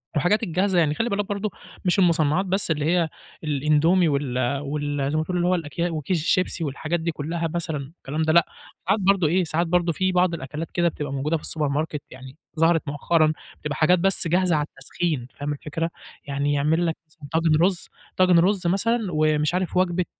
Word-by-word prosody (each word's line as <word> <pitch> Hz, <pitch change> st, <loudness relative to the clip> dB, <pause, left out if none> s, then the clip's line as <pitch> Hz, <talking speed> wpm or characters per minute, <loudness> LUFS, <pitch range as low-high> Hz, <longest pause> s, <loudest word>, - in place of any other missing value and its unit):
والحاجات 175 Hz, +10 st, +2 dB
الجاهزة 185 Hz, 0 st, +1 dB
يعني، 155 Hz, -3 st, +2 dB
خلِّ 235 Hz, +1 st, -1 dB
بالك 200 Hz, 0 st, -1 dB
برضو 205 Hz, 0 st, -2 dB, 0.3 s
مش 180 Hz, +2 st, +2 dB
المُصنّعات 170 Hz, 0 st, +3 dB
بس 190 Hz, -2 st, 0 dB
اللي 150 Hz, -1 st, 0 dB
هي 170 Hz, -1 st, +2 dB, 0.3 s
الإندومي 155 Hz, +4 st, +3 dB
وال 140 Hz, -4 st, -1 dB, 0.2 s
وال 145 Hz, -1 st, -2 dB
زي 155 Hz, -, 0 dB
ما 155 Hz, -, +1 dB
تقول 180 Hz, +2 st, -3 dB
اللي 175 Hz, -, +1 dB
هو 185 Hz, -, +3 dB
الأكيا 170 Hz, +1 st, -2 dB
وكيس 160 Hz, +1 st, -2 dB
الشيبسي 180 Hz, -1 st, +1 dB
والحاجات 155 Hz, +4 st, -2 dB
دي 170 Hz, +1 st, -1 dB
كلّها 165 Hz, +2 st, -3 dB
مثلًا 160 Hz, -3 st, -2 dB, 0.2 s
الكلام 150 Hz, +4 st, -4 dB
ده، 160 Hz, 0 st, +2 dB
لأ، 170 Hz, -1 st, +6 dB, 0.4 s
ساعات 200 Hz, +3 st, +3 dB
برضو 190 Hz, -4 st, +3 dB
إيه، 180 Hz, +4 st, +2 dB
ساعات 165 Hz, +1 st, -1 dB
برضو 175 Hz, 0 st, +2 dB
في 185 Hz, +4 st, 0 dB
بعض 180 Hz, -1 st, +2 dB
الأكلات 150 Hz, +2 st, -5 dB
كده 175 Hz, 0 st, +1 dB
بتبقى 145 Hz, -3 st, -5 dB
موجودة 150 Hz, +4 st, 0 dB
في -, -, -14 dB
السوبر 150 Hz, -3 st, -2 dB
ماركت 150 Hz, 0 st, -2 dB
يعني 130 Hz, +2 st, -11 dB, 0.2 s
ظهرت 165 Hz, -2 st, +3 dB
مؤخرًا، 155 Hz, +2 st, +2 dB, 0.3 s
بتبقى 150 Hz, 0 st, -3 dB
حاجات 175 Hz, +3 st, +4 dB
بس 195 Hz, -2 st, +1 dB
جاهزة 180 Hz, 0 st, +2 dB
على 150 Hz, -, +1 dB
التسخين، 135 Hz, -1 st, -3 dB
فاهم 145 Hz, +1 st, -4 dB
الفكرة؟ 155 Hz, +3 st, -3 dB, 0.4 s
يعني 140 Hz, +1 st, 0 dB
يعمل 155 Hz, +4 st, +2 dB
لك 165 Hz, -1 st, -1 dB
مثلًا 155 Hz, -2 st, -13 dB
طاجن 160 Hz, -1 st, +3 dB
رز، 180 Hz, 0 st, +1 dB, 0.3 s
طاجن 185 Hz, -2 st, +5 dB
رز 185 Hz, +1 st, +2 dB
مثلًا 230 Hz, +7 st, +1 dB
ومش 155 Hz, 0 st, +1 dB
عارف 180 Hz, 0 st, -1 dB
وجبة 180 Hz, -1 st, +1 dB
165 Hz, 195 wpm, -24 LUFS, 150-180 Hz, 0.4 s, لأ